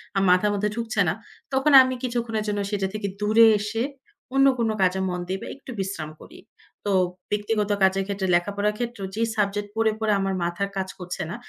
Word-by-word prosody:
আমার 195 0 +2
মাথার 185 +3 +3
মধ্যে 205 +1 0
ঢুকছে 230 -1 -1
না। - - +1 0.4
তখন 270 +3 +3
আমি 260 0 +1
কিছুক্ষণের 235 -3 -2
জন্য 205 0 -1
সেটা 195 -2 0
থেকে 215 -1 -3
দূরে 215 +2 +6
এসে 210 +2 -3 0.5
অন্য 270 0 +5
কোন 230 -1 +1
কাজে 190 0 +2
মন 180 0 -3
দেই 190 +1 -2
বা - - -7
একটু 270 -1 -11
বিশ্রাম 190 -5 -3
করি। 345 - -13 0.5
তো 205 - 0 0.4
ব্যক্তিগত 210 0 0
কাজের 190 0 +3
ক্ষেত্রে 200 -1 -2
লেখাপড়ার 205 +4 0
ক্ষেত্রেও 235 -4 -4
যে, 225 - -2 0.2
সাবজেক্ট 205 0 0
পড়ে, 225 0 +2
পড়ে, 220 -1 +1
আমার 195 0 -1
মাথার 175 +3 -2
কাজ 190 -1 -2
করছে 180 -1 -5
না, 175 - -4
205 Hz, 195 wpm, -24 LUFS, 195-225 Hz, 0.5 s, দূরে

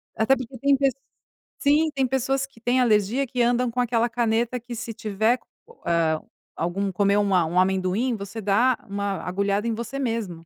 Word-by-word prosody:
até 245 +5 +3
porque 255 0 -7
tem 280 0 +3 0.8
sim 300 +2 +3
tem 265 -1 +1
pessoas 265 +1 0
que 275 -4 -21
têm 245 +2 +2
alergia 230 +4 +2
que 245 0 -2
andam 245 +1 +2
com 250 +2 0
aquela 235 0 +1
caneta 235 +1 0
que 240 +1 -8
se 230 0 -5
tiver 220 +4 0 1.2
algum 195 +4 -2
comer 200 +2 +2
um, 205 - +3
um 180 -1 +2
amendoim, 190 +6 +1
você 200 +2 -7
dá 230 +5 +3
uma 200 -1 -2
agulhada 200 +4 -1
em 230 - 0
você 235 +4 -5
mesmo, 220 -10 -3
230 Hz, 165 wpm, -24 LUFS, 200-250 Hz, 1.2 s, até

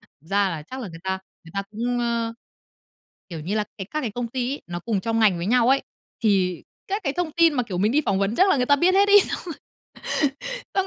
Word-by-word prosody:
thực 160 +4 -26
ra 200 -1 +2
là 160 -3 -5
chắc 260 +11 -8
là 230 - -5
người 165 -1 -11
ta 190 0 -1 0.3
người 165 - -13
ta 195 - -1
cũng, 240 +3 -2
ơ, 235 -1 -1 1.0
kiểu 165 -2 -6
như 180 +7 -3
là, 215 - +1
cái 190 -2 -6
các 305 - -1
cái 235 - -3
công 240 +2 -3
ty 250 +2 -2
ấy, - - -7
nó 175 0 -4
cùng 220 -1 -1
trong 225 +1 0
ngành 205 -6 +4
với 170 - -3
nhau 245 +2 +3
ấy, 270 +1 +4 0.4
thì 185 -4 +2 0.2
các 400 +1 -2
cái 275 - -1
thông 345 -2 -2
tin 335 -1 +4
mà, 250 - +1
kiểu, 195 -6 -5
mình 205 +4 +2
đi 300 +4 +3
phỏng 195 -1 +1
vấn 200 +3 0
chắc 380 +7 +5
là 295 - +4
người 250 - +2
ta 285 +2 +5
biết 350 +6 +3
hết 400 +1 +5
ấy, 410 0 +9 1.5
xong 385 -1 +1
230 Hz, 255 wpm, -24 LUFS, 195-275 Hz, 1.5 s, ấy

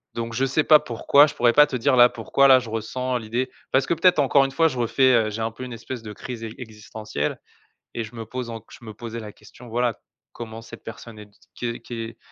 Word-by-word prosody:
donc 115 0 -4
je 130 +3 +1
sais 140 +3 +1
pas 155 -1 +7
pourquoi, 140 +5 +4
je - - -7
pourrais 120 -1 +3
pas 150 0 +7
te 135 - -5
dire, 130 +2 +2
là, 120 0 +7
pourquoi 140 +4 +2
là 130 -1 +7
je 120 -3 -8
ressens 125 +3 -2
l'idée. 120 +3 -3 0.2
Parce 135 0 +3
que - - 0
peut-être 170 -1 +3
encore 140 0 +4
une 135 - -4
fois 165 +3 +3
je 130 - -4
refais, 130 +2 +3
heu, - - -2
j'ai 110 +2 -5
un 110 0 -1
peu 130 - -9
une 125 -1 -7
espèce 115 +1 -7
de 105 -2 -8
crise 120 -1 -8
e 110 - -4
existentielle 105 - -5 0.5
et 115 - -3
je 110 +2 -11
me 115 - -6
pose 125 +1 -6
enc 115 -1 -7
je 120 - -14
me 110 - -8
posais 115 +1 -7
la 105 -2 -9
question, 125 - -16
voilà: 120 0 -1 0.3
«Comment 115 -1 -8
cette 115 - -12
personne 115 0 -10
est 105 - -10
d - - -28 0.2
qu'est 120 -1 -4
qu'est, 115 -1 -7
120 Hz, 255 wpm, -23 LUFS, 115-130 Hz, 0.5 s, pas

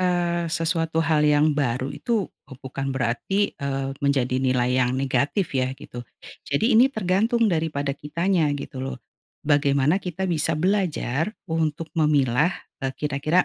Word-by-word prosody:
eee, 175 -2 0
sesuatu 165 0 -1
hal 155 -1 +2
yang 150 +1 +4
baru 130 -2 -1
itu 225 -5 -1 0.4
bukan 135 +1 -4
berarti, 130 - 0
eee, 135 -1 -3
menjadi 130 -3 +1
nilai 130 -1 +2
yang 125 +1 +1
negatif 140 +7 0
ya 130 -1 -1
gitu, 120 - -9 0.5
jadi 220 - +2
ini 240 +4 +6
tergantung 220 +1 +1
daripada 150 -4 -1
kitanya 165 +3 0
gitu 140 -1 -7
loh, 130 0 -4 0.5
bagaimana 145 +3 +3
kita 185 +1 -4
bisa 165 -3 0
belajar 180 - 0
untuk 160 -2 -2
memilah, 150 -2 +3 0.3
eee, 135 0 -2
kira-kira 150 +4 +1
150 Hz, 135 wpm, -24 LUFS, 135-175 Hz, 0.5 s, ini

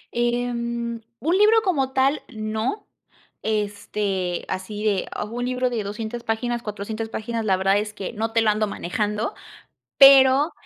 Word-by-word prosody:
Em, 235 -1 -1 0.2
un 320 +8 +1
libro 435 +2 +5
como 280 - 0
tal, 270 +3 +2
no, 220 - -3 0.5
este, 205 -3 -2
así 195 +3 -5
de 200 -3 +1
a - - -4
un 235 +3 -5
libro 250 0 0
de 230 -3 -2
200 220 +3 -5
páginas, 235 +2 -2
400 215 +1 -5
páginas, 225 0 -3
la 190 -3 +2
verdad 195 +2 +2
es 210 0 -4
que 200 +1 -5
no 225 0 -2
te 230 0 +2
lo 220 -1 +4
ando 215 0 0
manejando, 210 +4 -2 0.6
pero, 275 +2 +7
225 Hz, 150 wpm, -23 LUFS, 210-245 Hz, 0.6 s, pero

